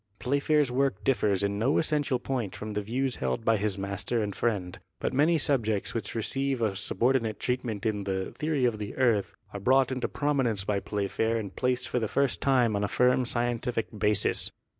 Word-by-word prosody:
Playfair's 140 Hz, +2 st, +1 dB
work 125 Hz, -6 st, 0 dB
differs 105 Hz, -6 st, +2 dB
in 100 Hz, 0 st, -1 dB
no 130 Hz, +6 st, +2 dB
essential 150 Hz, -4 st, +1 dB
point 125 Hz, -5 st, -3 dB
from 105 Hz, 0 st, -6 dB
the 105 Hz, -, -1 dB
views 125 Hz, +5 st, -1 dB
held 115 Hz, -, -2 dB
by 115 Hz, -1 st, +4 dB
his 100 Hz, -1 st, -1 dB
master 100 Hz, +4 st, -2 dB
and 100 Hz, -2 st, -4 dB
friend, 95 Hz, -6 st, -1 dB, 0.2 s
but -, -, -2 dB
many 155 Hz, +5 st, +4 dB
subjects 115 Hz, -8 st, 0 dB
which 110 Hz, -2 st, -4 dB
receive 135 Hz, +4 st, 0 dB
a 110 Hz, -4 st, 0 dB
subordinate 115 Hz, +2 st, 0 dB
treatment 120 Hz, -4 st, -2 dB
in 105 Hz, -3 st, -1 dB
the 95 Hz, -1 st, -2 dB
"Theory 150 Hz, -4 st, 0 dB
of 115 Hz, -3 st, 0 dB
the 105 Hz, -1 st, -5 dB
Earth" 115 Hz, -6 st, +2 dB, 0.2 s
are 100 Hz, -, -4 dB
brought 130 Hz, +5 st, +3 dB
into 130 Hz, -1 st, -1 dB
prominence 135 Hz, -9 st, 0 dB
by 100 Hz, 0 st, 0 dB
Playfair 105 Hz, +3 st, -1 dB
and 100 Hz, -4 st, -5 dB
placed 125 Hz, 0 st, 0 dB
for 125 Hz, -, 0 dB
the 110 Hz, -, -1 dB
first 140 Hz, +3 st, 0 dB
time 125 Hz, -5 st, +3 dB
on 100 Hz, -, 0 dB
a -, -, +1 dB
firm 125 Hz, +3 st, +3 dB
scientific 120 Hz, -1 st, -1 dB
basis. 105 Hz, -1 st, +1 dB
115 Hz, 190 wpm, -28 LUFS, 105-130 Hz, 0.2 s, by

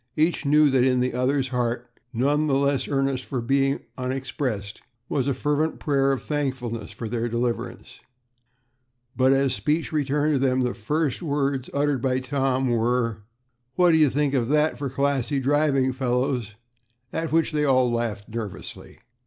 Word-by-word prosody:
Each 160 Hz, -1 st, +1 dB
knew 150 Hz, 0 st, +5 dB
that 130 Hz, -2 st, +3 dB
in 125 Hz, -1 st, +3 dB
the 125 Hz, +1 st, 0 dB
other's 130 Hz, +2 st, 0 dB
heart, 120 Hz, -1 st, -1 dB, 0.2 s
none 145 Hz, +5 st, +1 dB
the 135 Hz, -, +2 dB
less 140 Hz, 0 st, +1 dB
earnest 135 Hz, -2 st, 0 dB
for 130 Hz, -, -4 dB
being 135 Hz, +3 st, +1 dB, 0.2 s
unexpressed, 125 Hz, -5 st, -3 dB, 0.3 s
was 135 Hz, -2 st, -1 dB
a 140 Hz, -, +2 dB
fervent 150 Hz, +4 st, 0 dB
prayer 140 Hz, -2 st, +2 dB
of 135 Hz, -, -2 dB
thankfulness 130 Hz, -7 st, -3 dB
for 115 Hz, -, -6 dB
their 120 Hz, +1 st, -2 dB
deliverance; 120 Hz, 0 st, -3 dB, 1.2 s
but 130 Hz, +1 st, +4 dB
as 135 Hz, -1 st, +2 dB
speech 155 Hz, +5 st, -1 dB
returned 150 Hz, 0 st, +1 dB
to 140 Hz, -, +2 dB
them, 130 Hz, -1 st, +2 dB
the 125 Hz, -1 st, 0 dB
first 145 Hz, -, -1 dB
words 140 Hz, -4 st, -1 dB
uttered 140 Hz, -2 st, 0 dB
by 130 Hz, 0 st, +1 dB
Tom, 130 Hz, -1 st, 0 dB
were, 115 Hz, -1 st, 0 dB, 0.6 s
"What 180 Hz, -1 st, +5 dB
do 160 Hz, -, +4 dB
you 155 Hz, -3 st, +5 dB
think 145 Hz, +1 st, 0 dB
of 125 Hz, -4 st, +1 dB
that 150 Hz, +3 st, +2 dB
for 140 Hz, -2 st, -4 dB
classy 140 Hz, 0 st, 0 dB
driving, 135 Hz, -1 st, +2 dB
fellows?" 125 Hz, -3 st, -1 dB, 0.6 s
at 165 Hz, 0 st, -2 dB
which 165 Hz, 0 st, +2 dB
they 150 Hz, -1 st, 0 dB
all 130 Hz, -3 st, +3 dB
laughed 115 Hz, -3 st, -2 dB
nervously. 110 Hz, -4 st, -7 dB
135 Hz, 160 wpm, -24 LUFS, 125-145 Hz, 1.2 s, knew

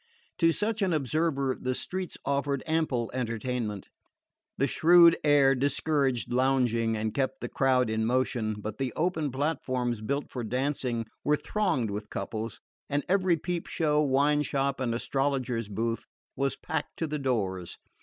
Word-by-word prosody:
To 165 Hz, -1 st, +5 dB
such 215 Hz, +5 st, -1 dB
an 190 Hz, -3 st, +2 dB
observer 140 Hz, -2 st, 0 dB
the 130 Hz, 0 st, -1 dB
streets 185 Hz, +5 st, -4 dB
offered 140 Hz, 0 st, 0 dB
ample 155 Hz, -8 st, 0 dB
entertainment. 115 Hz, -4 st, -3 dB, 0.7 s
The 135 Hz, -, +2 dB
shrewd 170 Hz, +4 st, +6 dB
air 145 Hz, -2 st, +5 dB
discouraged 135 Hz, -2 st, 0 dB
lounging 120 Hz, -3 st, +2 dB
and 110 Hz, 0 st, -2 dB
kept 135 Hz, 0 st, -1 dB
the 120 Hz, -, -4 dB
crowd 130 Hz, -1 st, +2 dB
in 110 Hz, 0 st, 0 dB
motion; 120 Hz, -3 st, 0 dB
but 105 Hz, +3 st, -6 dB
the 135 Hz, -2 st, -1 dB
open 160 Hz, -3 st, 0 dB
platforms 130 Hz, -5 st, -1 dB
built 140 Hz, +6 st, -2 dB
for 125 Hz, -, -4 dB
dancing 125 Hz, -1 st, -1 dB, 0.2 s
were 150 Hz, 0 st, +3 dB
thronged 165 Hz, -, 0 dB
with 105 Hz, +1 st, -5 dB
couples, 110 Hz, -1 st, -4 dB, 0.3 s
and 145 Hz, 0 st, -1 dB
every 185 Hz, -2 st, +3 dB
peep 175 Hz, +2 st, -3 dB
show, 150 Hz, -2 st, +1 dB
wine 145 Hz, +1 st, +3 dB
shop 140 Hz, -1 st, -1 dB
and 120 Hz, -3 st, 0 dB
astrologer's 130 Hz, -3 st, -1 dB
booth 115 Hz, +3 st, -2 dB, 0.3 s
was 135 Hz, +1 st, 0 dB
packed -, -, -4 dB
to 165 Hz, -, -1 dB
the 150 Hz, -1 st, -3 dB
doors. 95 Hz, -10 st, -2 dB
135 Hz, 150 wpm, -28 LUFS, 120-150 Hz, 0.7 s, shrewd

